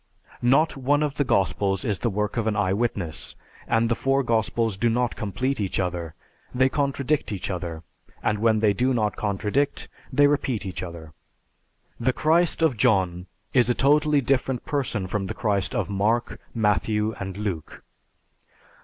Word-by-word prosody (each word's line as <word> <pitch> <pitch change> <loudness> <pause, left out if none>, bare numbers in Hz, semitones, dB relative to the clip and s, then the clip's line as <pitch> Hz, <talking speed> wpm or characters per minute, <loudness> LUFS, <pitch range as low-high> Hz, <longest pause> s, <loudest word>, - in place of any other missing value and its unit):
Not 135 +7 +3
one 145 +2 +1
of 145 -2 -2
the 145 - +3
Gospels 95 -4 +1
is 100 -5 0
the 120 - 0
work 105 0 -2
of 115 -2 -1
an 110 - +1
eyewitness, 95 -5 -1 0.3
and 115 0 +2
the 115 - +2
four 135 +3 +1
Gospels 115 -2 0
do 115 +5 +1
not 120 +1 0
complete 110 +5 -2
each 95 - -1
other; 85 -3 -3 0.4
they 130 +1 +4
contradict 140 0 0
each 100 -1 -3
other; 85 -3 -5 0.4
and 105 - +1
when 110 -1 +3
they 105 -2 +4
do 125 +5 +1
not 105 -3 0
contradict, 105 +7 -1 0.2
they 145 - +5
repeat 135 -6 0
each 95 - -5
other. 85 -3 -8 0.9
The 125 +2 +1
Christ 165 +3 +2
of 145 -8 +2
John 90 -4 +2 0.3
is 125 -2 +4
a 120 - +2
totally 150 +1 +3
different 130 -1 0
person 130 -9 -1
from 95 +1 -2
the - - -5
Christ 105 -4 -1
of - - 0
Mark, 105 +4 0 0.2
Matthew, 105 0 +1
and 95 -1 -5
Luke. 100 -7 -5
110 Hz, 160 wpm, -25 LUFS, 100-130 Hz, 0.9 s, they